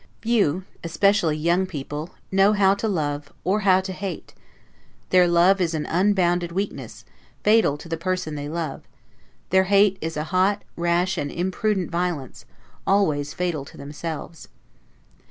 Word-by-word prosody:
Few, 200 -7 +1 0.2
(especially 170 -1 +2
young) 170 +4 +1
people 150 -1 -6 0.2
know 195 +2 +4
how 195 -2 +4
to 200 +3 -2
love, 145 -6 -2
or 195 +5 +1
how 190 -2 +4
to 190 0 -5
hate; 185 -4 -6 0.8
their 180 -1 +6
love 175 +3 +4
is 165 -2 0
an 150 - -2
unbounded 175 -1 +1
weakness, 195 +4 -5 0.4
fatal 210 -9 +4
to 150 - -11
the 165 0 -3
person 185 -2 -2
they 145 0 -5
love; 160 -3 -4 0.7
their 190 0 +4
hate 200 0 +4
is 160 0 -4
a 150 - -1
hot, 195 +3 +2
rash, 175 +2 0
and 145 - -3
imprudent 190 +1 -1
violence, 170 -7 -3 0.4
always 155 -8 +1
fatal 175 -5 -2
to - - -14
themselves. 155 +3 -7
175 Hz, 145 wpm, -23 LUFS, 160-195 Hz, 0.8 s, their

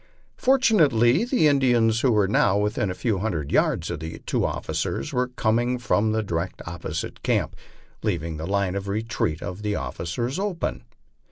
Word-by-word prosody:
Fortunately 165 - +4
the 245 - +3
Indians, 120 -5 +3
who 130 - +3
were 105 -3 +3
now 100 0 +3
within 105 -1 0
a 90 - -3
few 100 +1 -1
hundred 85 -9 -2
yards 80 - +1
of 85 - -4
the 80 +1 -6
two - - 0
officers, 70 - -2
were 125 0 +1
coming 120 0 0
from 110 -3 +1
the 110 0 0
di 95 - -6
rection 85 +3 -3
opposite 80 -2 -5
camp, - - 0 0.5
leaving 85 -6 -2
the 80 +2 -5
line 100 -2 0
of 100 0 -4
retreat 105 -6 -2
of 90 +3 -6
the 105 -1 -1
officers 85 - -3
open. 195 -4 -3
105 Hz, 170 wpm, -24 LUFS, 90-125 Hz, 0.5 s, Fortunately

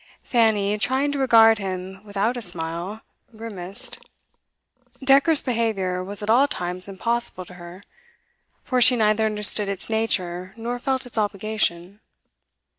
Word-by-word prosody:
Fanny, 210 -3 +2
trying 265 +6 +1
to 285 - -3
regard 225 -4 +6
him 190 0 -6
without 210 +3 -1
a 245 - -5
smile, 175 +3 -3 0.4
grimaced; 200 -4 -5 1.0
decorous 280 +3 +4
behaviour 215 -7 -1
was 200 +2 -6
at 205 - -4
all 265 +5 +5
times 180 -8 -4
impossible 200 -1 -3
to 180 - -14
her, 175 +2 -12 0.8
for 255 -1 0
she 250 +1 +7
neither 220 -1 +2
understood 210 -1 +3
its 200 +2 -5
nature 185 -4 -2
nor 240 +2 -4
felt 265 +1 -1
its 235 -2 -5
obligation. 200 -2 -2
210 Hz, 130 wpm, -23 LUFS, 185-235 Hz, 1.0 s, she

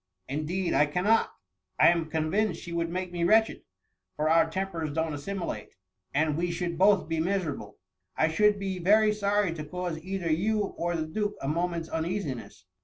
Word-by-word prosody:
^^ - - -4
Indeed, 170 +5 -1
I 150 - +4
cannot. 195 +9 +2 0.5
I - - +8
am 170 -2 0
convinced 165 +4 0
she 170 - -8
would 170 0 -1
make 180 +1 -3
me 175 -1 -2
wretched, 220 +5 +3 0.5
for 155 +1 +1
our 165 0 +4
tempers 170 -3 -3
don^t 160 +1 -1
assimilate, 170 - -5 0.4
and 150 0 +1
we 175 +2 -1
should 170 0 -2
both 195 -3 +4
be 165 0 -1
miserable. 160 - -2 0.4
I 160 - +3
should 210 +5 +3
be 195 -2 -3
very 210 +4 +4
sorry 205 -3 +1
to 155 -2 -6
cause 175 +1 -4
either 185 -1 -3
you 210 +7 +1
or 175 -3 -2
the 160 -1 -1
duke 205 +6 -2
a 135 - -4
moment's 170 +2 -1
uneasiness. 155 - -4
170 Hz, 180 wpm, -28 LUFS, 160-195 Hz, 0.5 s, I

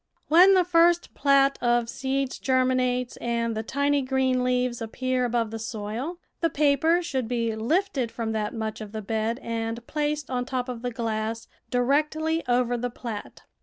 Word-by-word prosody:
When 365 +5 +7
the 370 - +5
first 345 0 +3
plat 275 -1 +3
of 240 -1 +2
seeds 265 +2 -2
germinates 255 -1 +1
and 235 -1 -1
the 220 - -1
tiny 280 +4 +1
green 260 -1 +1
leaves 250 -1 0
appear 255 +3 -1
above 235 -2 0
the 225 - -5
soil, 225 +9 -4 0.2
the 330 - +2
paper 305 +4 +2
should 265 -8 -2
be 230 -2 -1
lifted 270 - 0
from 225 -2 -3
that 215 -1 -1
much 220 -1 -4
of 210 0 -8
the 215 -1 -5
bed 220 +2 -1
and 230 0 -3
placed 300 -2 -2
on 250 -1 -1
top 255 -1 -3
of 240 -2 -5
the 245 - -2
glass, 225 -1 -3 0.2
directly 305 +6 +1
over 245 0 +2
the 245 +1 -2
plat. 230 -3 -7
250 Hz, 165 wpm, -26 LUFS, 230-280 Hz, 0.2 s, When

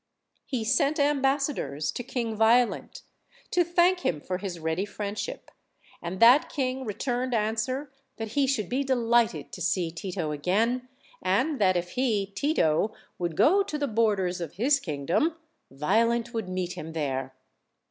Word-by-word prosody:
He 255 -5 -2
sent 275 +7 +2
ambassadors 275 - +1
to - - -5
King 235 -2 -3
Violent, 230 +3 +2 0.5
to 355 - +4
thank 350 +2 +3
him 165 - -1
for 185 +4 -4
his 190 -3 -5
ready 160 +3 -1
friendship; 205 - -5 0.5
and 175 +2 -5
that 245 +6 +7
king 260 -2 -2
returned 245 +4 -2
answer 225 +6 -1 0.3
that 225 -1 -4
he 275 +4 +1
should 225 -8 0
be 265 +3 0
delighted 235 - +1
to - - -8
see 175 -1 0
Tito 170 -2 -4
again, 220 - 0 0.3
and 255 - +1
that 185 -2 +4
if 175 0 -3
he 230 -6 +1
(Tito) 200 - +1 0.2
would 170 -2 -3
go 345 - +5
to 350 -6 -3
the 290 -1 -1
borders 205 -6 +1
of 165 - -5
his 275 +8 +2
kingdom, 170 - 0 0.3
Vio 185 +12 +2
lent 235 +1 -1
would 220 -5 -3
meet 185 -1 -2
him 160 -3 -7
there. 135 -4 -3
220 Hz, 155 wpm, -27 LUFS, 180-260 Hz, 0.5 s, that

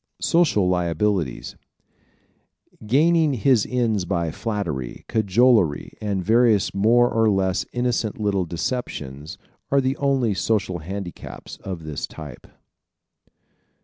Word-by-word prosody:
Social 150 - +2
Liabilities 90 -3 -1 1.3
¶ - - -11
Gaining 155 +3 +3
his 125 -1 +2
ends 115 -6 0
by 85 -3 -1
flattery, 85 - -4
cajolery, 110 - +2
and 100 -4 -2
various 115 -2 +3
more 115 +5 +4
or 115 -1 +3
less 95 -2 0
innocent 120 -4 -1
little 100 -3 0
deceptions 80 - -5 0.3
are 140 - +3
the 130 0 0
only 135 -6 +1
social 95 -2 -1
handicaps 90 +2 -8
of 90 -4 -7
this 75 -2 -5
type. 75 -5 -11
105 Hz, 110 wpm, -23 LUFS, 90-120 Hz, 1.3 s, more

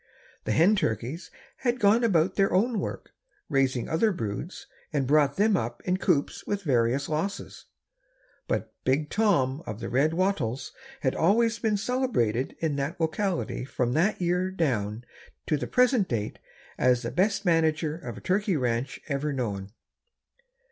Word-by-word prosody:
The - - -1
hen 180 +7 +5
turkeys 150 - -2 0.3
had 245 -1 -1
gone 215 +3 +4
about 185 -5 +3
their 195 0 +2
own 220 +4 +2
work, - - -5 0.4
raised 135 -4 +1
other 190 +7 +2
broods 115 - -5 0.3
and 140 -4 0
brought 145 0 +3
them 210 +1 +3
up - - -3
in 180 0 +1
coops 170 -7 0
with 205 -1 -2
various 130 -2 +1
losses, 160 +6 -4 0.8
but - - -2
Big 145 +3 +1
Tom 160 -11 +2
of 105 0 -5
the 115 - -5
red 145 +6 +2
wattles 160 - -1 0.3
has - - +1
always 225 +5 +2
been 215 -2 +1
celebrated 200 - 0
in 155 -3 -1
that 145 +5 -3
locality 165 - -1
from 125 -2 -1
that 180 +9 +2
year 180 +1 +1
down 120 - -1 0.4
to 155 - +1
the 145 - -3
present 250 -5 +3
date 110 -6 -3 0.4
as 125 -1 +3
the 115 - -3
best 200 +3 +1
manager 160 -2 +2
of 170 - -8
a - - -9
turkey 190 -1 +1
ranch 125 0 -1
ever 145 0 -1
known. 100 -7 -3
160 Hz, 155 wpm, -27 LUFS, 130-195 Hz, 0.8 s, hen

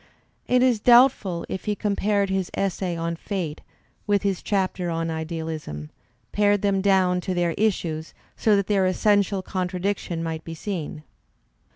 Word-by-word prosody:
It 250 0 +4
is 250 -4 +3
doubtful 235 -7 +4
if 190 - -5
he 210 - 0
compared 200 -1 0
his 190 -2 -1
essay 185 -2 -1
on 165 0 -2
"Fate" 165 -4 -4 0.5
with 205 -1 +2
his 195 -3 0
chapter 185 -3 -1
on 165 0 -2
"Idealism," 160 - -5 0.4
pared 205 -1 +2
them 195 -1 +2
down 185 -2 +3
to 185 0 -3
their 175 -1 +1
issues 165 -6 -1 0.2
so 215 -2 +3
that 200 -1 +1
their 195 -2 +2
essential 200 0 +2
contradiction 185 -2 -2
might 160 -1 -4
be 165 - -7
seen. 160 -4 -5
185 Hz, 150 wpm, -24 LUFS, 165-205 Hz, 0.5 s, It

